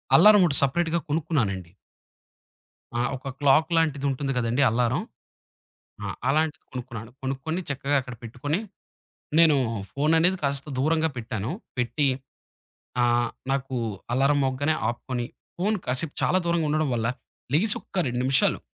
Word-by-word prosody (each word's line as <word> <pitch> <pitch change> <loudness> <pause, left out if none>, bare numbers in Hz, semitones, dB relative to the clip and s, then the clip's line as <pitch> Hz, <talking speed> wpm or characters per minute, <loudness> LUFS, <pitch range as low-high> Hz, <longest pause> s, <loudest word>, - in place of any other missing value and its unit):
Alarm 205 +3 +8
ఒకటి 140 -4 +3
సెపరేట్‌‌గా 170 +4 +1
కొనుక్కున్నానండి. 115 - -1 1.3
ఆ! - - +2
ఒక 135 +1 -6
క్లాక్ 145 +3 +4
లాంటిది 145 -4 +1
ఉంటుంది 135 +1 -2
కదండీ 120 +3 +1
అల్లారం. 120 +1 +1 1.0
ఆ! - - -3 0.2
అలాంటిది 155 +2 +1
కొనుక్కున్నాను. 120 -3 -7
కొనుక్కొని 135 +6 -2
చక్కగా 140 +1 0
అక్కడ 125 -1 -8
పెట్టుకొని, 140 - -2 0.8
నేను 160 -3 +6 0.3
ఫోను 150 +3 +1
అనేది 180 +3 +3
కాస్త 140 +1 -1
దూరంగా 160 +3 +2
పెట్టాను. 110 -1 -3 0.3
పెట్టి, 135 +4 +1 1.0
ఆహ్, 120 -1 +2 0.2
నాకు 135 -1 -1 0.4
అలారం 140 +3 +3
మోగ్గానే 140 +4 +1
ఆపుకొని, 120 0 -4 0.3
ఫోను 210 +4 +1
కాసేపు 130 +4 -1
చాలా 185 - +3
దూరంగా 170 -2 +1
ఉండడం 155 -1 +1
వల్ల, 115 0 0 0.5
లెగిసొక్క 205 +2 +1
2 120 0 -2
నిమిషాలు 135 0 +3
140 Hz, 125 wpm, -25 LUFS, 125-160 Hz, 1.3 s, అల్లారం